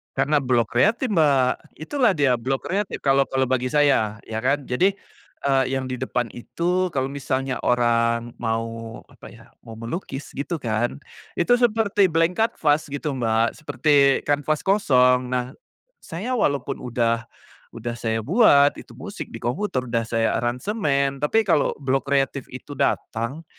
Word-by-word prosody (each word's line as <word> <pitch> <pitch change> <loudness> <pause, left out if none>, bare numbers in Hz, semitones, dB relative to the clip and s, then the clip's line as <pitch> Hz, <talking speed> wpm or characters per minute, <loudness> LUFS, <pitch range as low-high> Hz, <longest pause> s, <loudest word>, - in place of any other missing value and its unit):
Karena 145 +2 +2
blok 120 -4 +1
kreatif, 215 - +2
Mbak, 140 -7 +1
itulah 225 - +1
dia 130 -5 +2
blok 135 +3 -2
kreatif 200 +2 -3
kalau 135 0 +3
kalau 135 0 0
bagi 130 0 0
saya, 135 -7 +2
ya 110 0 -4
kan. 135 +3 0
Jadi, 185 +12 +1 0.5
eee, 135 -1 +3
yang 130 -1 -3
di 125 - -4
depan 125 -3 -2
itu 180 +9 -1
kalau 135 +1 -1
misalnya 135 -1 -2
orang 115 -1 +1
mau 115 0 -4
apa - - -14
ya, - - -16
mau 115 -1 -11
melukis 135 - -6
gitu 145 +5 -4
kan, 120 0 -2 0.3
itu 245 +8 +3
seperti 215 -4 +3
blank 165 +3 +1
canvas 155 -9 +1
gitu, 145 +1 -4
Mbak, 115 -3 0
seperti 145 -2 +2
kanvas 145 +1 0
kosong. 125 -10 +3
Nah, 125 0 -2 0.5
saya 195 +10 -6
walaupun 140 - 0
udah 115 -1 -1 0.5
udah 120 +1 -4
saya 110 -1 -1
buat 145 - +5
itu - - -13
musik - - -7
di - - -9
komputer, 130 +1 -1
udah 115 -2 -2
saya 115 0 +1
aransemen, 140 - -1
tapi 220 +10 +2
kalau 170 -7 +1
blok 135 0 -1
kreatif 135 -1 0
itu 130 +3 -10
datang, 130 +2 -2
135 Hz, 150 wpm, -23 LUFS, 120-155 Hz, 0.5 s, buat